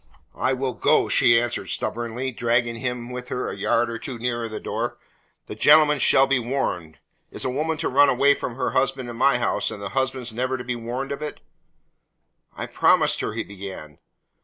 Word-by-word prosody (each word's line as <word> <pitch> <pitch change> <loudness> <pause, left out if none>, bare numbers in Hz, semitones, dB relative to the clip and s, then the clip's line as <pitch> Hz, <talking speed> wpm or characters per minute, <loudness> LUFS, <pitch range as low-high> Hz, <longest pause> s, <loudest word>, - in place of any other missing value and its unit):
"I 130 - +2
will 130 0 -2
go," - - +2
she 120 -1 +5
answered 120 0 -3
stubbornly, 120 +3 -3
dragging 120 0 0
him 125 0 -4
with 125 0 -7
her 125 - -3
a - - -6
yard 115 +4 +1
or 115 0 -5
two 130 -3 -6
nearer 120 -1 -2
the 110 - -6
door. - - -3 0.5
"The - - -7
gentleman 150 -2 +5
shall 135 +1 +5
be 135 -1 +2
warned. 115 - -3 0.3
Is - - -6
a 130 - 0
woman 155 +4 -1
to - - -2
run 140 +2 +5
away 140 +2 +4
from 125 -3 -5
her 125 0 -1
husband 130 -2 -1
in - - -9
my 130 +1 +3
house, 120 - 0
and 105 - -7
the 100 -1 -5
husband 130 -2 -2
never 130 +3 -1
be 125 0 -3
warned 120 +4 -5
of 140 - -4
it?" 150 -1 -5 1.2
"I - - -3
promised - - +2
her," - - -3
he - - -3
began. 95 -7 -9
125 Hz, 195 wpm, -23 LUFS, 115-135 Hz, 1.2 s, she